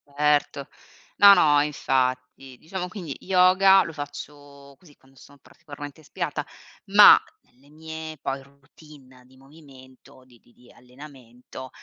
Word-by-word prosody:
Certo. 145 Hz, -1 st, -1 dB, 0.5 s
No, 200 Hz, 0 st, +8 dB
no, 145 Hz, -5 st, +3 dB
infatti, 130 Hz, -2 st, -3 dB
diciamo, 180 Hz, +5 st, -7 dB
quindi 175 Hz, -8 st, -9 dB
yoga 190 Hz, +1 st, +3 dB
lo 165 Hz, -, -9 dB
faccio 145 Hz, -1 st, -11 dB
così, 155 Hz, -6 st, -23 dB
quando 135 Hz, 0 st, -27 dB
sono 140 Hz, +4 st, -19 dB
particolarmente 145 Hz, -1 st, -13 dB
ispirata, 150 Hz, -2 st, -6 dB, 0.4 s
ma 205 Hz, +1 st, +7 dB, 0.3 s
nelle 135 Hz, +3 st, -28 dB
mie 160 Hz, 0 st, -10 dB
poi 135 Hz, 0 st, -6 dB
routine 140 Hz, -2 st, -20 dB
di 130 Hz, +1 st, -24 dB
movimento, 135 Hz, -3 st, -19 dB
di 120 Hz, -2 st, -23 dB
di -, -, -29 dB
di 125 Hz, 0 st, -22 dB
allenamento, 125 Hz, -1 st, -14 dB
145 Hz, 125 wpm, -23 LUFS, 130-160 Hz, 0.5 s, No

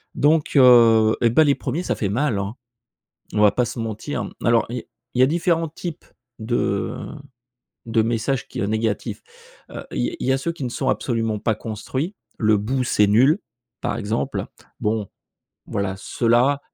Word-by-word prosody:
Donc, 150 Hz, +1 st, +2 dB
heu, 115 Hz, -4 st, +7 dB
et 120 Hz, -, +4 dB
bah, 140 Hz, +8 st, +5 dB
les 140 Hz, -2 st, +3 dB
1ers 150 Hz, +6 st, -3 dB
ça -, -, -1 dB
fait 100 Hz, -, -2 dB
mal, 115 Hz, -1 st, 0 dB
hein! 100 Hz, +3 st, -4 dB, 0.8 s
On 105 Hz, -, +1 dB
va 105 Hz, -1 st, +7 dB
pas 125 Hz, -, +1 dB
se 120 Hz, -, -6 dB
mentir, 115 Hz, +5 st, -4 dB
mmh. -, -, -7 dB
Alors, 115 Hz, -2 st, +3 dB
i 120 Hz, -1 st, -4 dB, 0.3 s
il -, -, -2 dB
y -, -, +7 dB
a -, -, +7 dB
différents 165 Hz, +2 st, +1 dB
types 165 Hz, +1 st, -7 dB, 0.3 s
de 110 Hz, -3 st, -1 dB, 0.9 s
de 115 Hz, -1 st, +2 dB
messages 120 Hz, +4 st, -1 dB
qui -, -, -5 dB
heu, 100 Hz, -, 0 dB
négatifs, 110 Hz, -1 st, -2 dB, 0.5 s
heu, -, -, -7 dB
i -, -, -2 dB
il -, -, -2 dB
y 130 Hz, -, +3 dB
a 135 Hz, -, +1 dB
ceux 170 Hz, +5 st, -2 dB
qui 165 Hz, -, -10 dB
ne -, -, -1 dB
sont 130 Hz, +2 st, -2 dB
absolument 115 Hz, -5 st, 0 dB
pas 110 Hz, +1 st, 0 dB
construits. 125 Hz, -, -4 dB, 0.3 s
«Le 110 Hz, -2 st, +4 dB
bout, 125 Hz, +6 st, -1 dB
c'est 105 Hz, -4 st, +3 dB
nul!», 130 Hz, -, +4 dB, 0.4 s
par -, -, -2 dB
exemple. 110 Hz, 0 st, -2 dB, 0.3 s
Bon, 105 Hz, -2 st, -1 dB, 0.6 s
voilà, 100 Hz, -1 st, -2 dB
ceux-là 120 Hz, +7 st, +2 dB
115 Hz, 180 wpm, -22 LUFS, 110-135 Hz, 0.9 s, heu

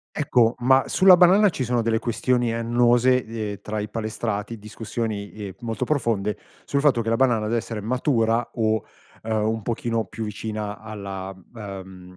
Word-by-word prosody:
Ecco, 125 Hz, -5 st, +2 dB
ma 130 Hz, +2 st, +3 dB
sulla 185 Hz, -1 st, +7 dB
banana 190 Hz, +4 st, +6 dB
ci 140 Hz, -, -4 dB
sono 120 Hz, -1 st, 0 dB
delle 110 Hz, 0 st, +1 dB
questioni 120 Hz, 0 st, 0 dB
annose, 120 Hz, +2 st, +3 dB
ehm, 110 Hz, -2 st, -5 dB
tra 105 Hz, 0 st, -4 dB
i 105 Hz, 0 st, -3 dB
palestrati, 110 Hz, 0 st, -3 dB
discussioni 105 Hz, -1 st, -5 dB
ehm, 100 Hz, -3 st, -7 dB
molto 115 Hz, -3 st, -3 dB
profonde 115 Hz, -8 st, 0 dB, 0.3 s
sul 140 Hz, -, 0 dB
fatto 140 Hz, -5 st, +3 dB
che 115 Hz, -, -3 dB
la 115 Hz, -, +2 dB
banana 115 Hz, -3 st, +2 dB
deve 115 Hz, +2 st, +1 dB
essere 110 Hz, -1 st, -5 dB
matura 115 Hz, 0 st, 0 dB
o, 110 Hz, -2 st, 0 dB, 0.4 s
uhm, 110 Hz, 0 st, -4 dB
un 110 Hz, -1 st, -1 dB
pochino 115 Hz, 0 st, -2 dB
più 110 Hz, 0 st, -6 dB
vicina 105 Hz, 0 st, -5 dB
alla 100 Hz, -3 st, -6 dB, 0.2 s
uhm, 95 Hz, -3 st, -9 dB
115 Hz, 165 wpm, -24 LUFS, 105-120 Hz, 0.4 s, sulla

